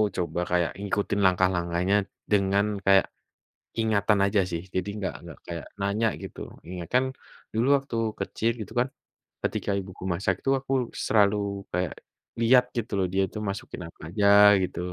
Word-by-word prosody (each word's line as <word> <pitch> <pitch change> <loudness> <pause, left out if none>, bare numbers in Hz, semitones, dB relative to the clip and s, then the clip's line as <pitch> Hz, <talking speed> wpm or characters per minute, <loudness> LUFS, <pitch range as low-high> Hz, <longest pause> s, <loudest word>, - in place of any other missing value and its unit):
coba 85 -1 -2
kayak 90 -1 +2
ngikutin 100 0 -1
langkah-langkahnya, 90 0 +2 0.4
dengan 100 0 +3 0.2
kayak, 95 -1 +6 0.7
ingatan 105 -2 +2
aja 100 0 +2
sih. 85 0 -3
Jadi, 95 +2 -1
enggak 95 -3 -3
enggak 85 -5 -11
kayak 85 -1 -6
nanya 100 +3 +1 0.2
gitu, - - -8 0.3
ingat 90 -2 -6
kan, 130 +1 +4 0.5
dulu 115 +3 +1
waktu 135 -4 -5 0.3
kecil 115 +1 -1
gitu 105 - -7
kan. 125 - +2 0.6
Ketika - - -1
ibuku 95 -1 -9
masak, 95 +1 -1
itu 135 - +1
aku 135 0 -4 0.3
selalu 100 -1 +2
kayak, 90 -3 -1 0.5
lihat 125 +2 +6
gitu 110 -2 -3
loh. 95 - +2
Dia 95 - +3
itu - - -9
masukin 100 -2 -6
apa 80 - -16
aja? 100 +3 +1 0.4
Gitu, 90 - -4
100 Hz, 155 wpm, -26 LUFS, 90-105 Hz, 0.7 s, kayak